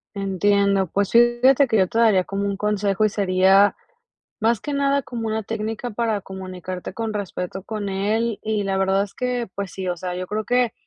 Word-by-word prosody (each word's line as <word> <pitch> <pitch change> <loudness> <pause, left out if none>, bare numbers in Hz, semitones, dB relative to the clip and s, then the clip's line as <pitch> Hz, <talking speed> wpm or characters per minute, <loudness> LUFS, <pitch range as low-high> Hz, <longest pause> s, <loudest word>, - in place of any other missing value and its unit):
Entiendo, 200 0 +1
pues 200 0 0
fíjate 240 +4 +5
que 220 - +3
yo 190 -2 +3
te 225 - -4
daría 210 -6 +4
como 200 0 -3
un 200 -1 -2
consejo 210 0 +1
y 215 - +3
sería 195 0 +3 0.6
más 225 0 +2
que 295 - -5
nada 280 0 +1
como 230 -3 -5
una 220 -1 -2
técnica 225 +2 -4
para 220 -2 -1
comunicarte 185 -1 -7
con 220 +1 -4
respeto 190 -2 -4
con 210 -1 -4
él, 210 +3 -1
y 215 -2 -1
la 195 -1 -1
verdad 195 +1 +2
es 200 - -13
que, 250 -2 -2
pues 200 -2 -4
sí, 190 -1 -6
o 175 - -1
sea, 180 0 -5
yo 185 0 -4
creo 215 +2 -3
que 245 -1 +1
205 Hz, 200 wpm, -22 LUFS, 195-225 Hz, 0.6 s, fíjate